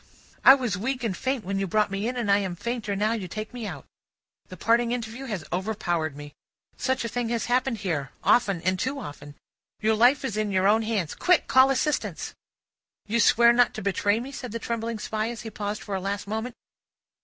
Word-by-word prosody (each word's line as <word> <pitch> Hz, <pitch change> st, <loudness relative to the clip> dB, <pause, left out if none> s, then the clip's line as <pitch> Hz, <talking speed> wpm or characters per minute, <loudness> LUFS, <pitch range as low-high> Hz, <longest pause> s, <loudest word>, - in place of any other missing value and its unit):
"I 265 Hz, -, +10 dB
was 240 Hz, -9 st, -2 dB
weak 250 Hz, +3 st, -2 dB
and 215 Hz, -5 st, -1 dB
faint 260 Hz, +1 st, -2 dB
when 195 Hz, +1 st, -2 dB
you 195 Hz, -, -1 dB
brought 210 Hz, +2 st, +1 dB
me 200 Hz, +3 st, -2 dB
in, 250 Hz, +1 st, -3 dB
and 225 Hz, -4 st, 0 dB
I 200 Hz, -, +5 dB
am 190 Hz, -3 st, -3 dB
fainter 220 Hz, +1 st, -3 dB
now 210 Hz, +2 st, +1 dB
you 210 Hz, -5 st, -4 dB
take 215 Hz, +5 st, -6 dB
me 240 Hz, -4 st, -5 dB
out. 150 Hz, -8 st, -7 dB, 0.6 s
The 185 Hz, -, -10 dB
parting 235 Hz, +5 st, +2 dB
interview 240 Hz, +2 st, -4 dB
has 205 Hz, -10 st, -4 dB
overpowered 175 Hz, -6 st, -1 dB
me. 145 Hz, 0 st, -9 dB, 0.4 s
Such 260 Hz, -2 st, -1 dB
a -, -, 0 dB
thing 240 Hz, 0 st, -2 dB
has 235 Hz, -1 st, -1 dB
happened 250 Hz, 0 st, +1 dB
here, 165 Hz, -9 st, -2 dB
often, 200 Hz, -8 st, +3 dB
and 185 Hz, +1 st, +1 dB
too 275 Hz, +2 st, -2 dB
often. 145 Hz, -, -9 dB, 0.4 s
Your 220 Hz, 0 st, +2 dB
life 245 Hz, +6 st, +4 dB
is 220 Hz, -5 st, -3 dB
in 215 Hz, -1 st, 0 dB
your 190 Hz, 0 st, +2 dB
own 220 Hz, +2 st, +4 dB
hands. 215 Hz, -8 st, -1 dB
Quick! 360 Hz, -2 st, +3 dB
Call 260 Hz, +1 st, +6 dB
assistance!" 285 Hz, +3 st, -1 dB, 0.7 s
"You 230 Hz, +3 st, 0 dB
swear 235 Hz, +2 st, +6 dB
not 245 Hz, 0 st, +3 dB
to 215 Hz, -, -5 dB
betray 205 Hz, +2 st, +1 dB
me?" 260 Hz, +3 st, -6 dB
said 250 Hz, -4 st, -7 dB
the -, -, -1 dB
trembling 230 Hz, 0 st, -3 dB
Spy, 215 Hz, +1 st, -2 dB
as 235 Hz, -1 st, -6 dB
he 225 Hz, -, -7 dB
paused 210 Hz, 0 st, -4 dB
for 205 Hz, -, -6 dB
a 190 Hz, -, -1 dB
last 200 Hz, +1 st, -3 dB
moment. 220 Hz, +3 st, -4 dB
220 Hz, 215 wpm, -26 LUFS, 195-240 Hz, 0.7 s, I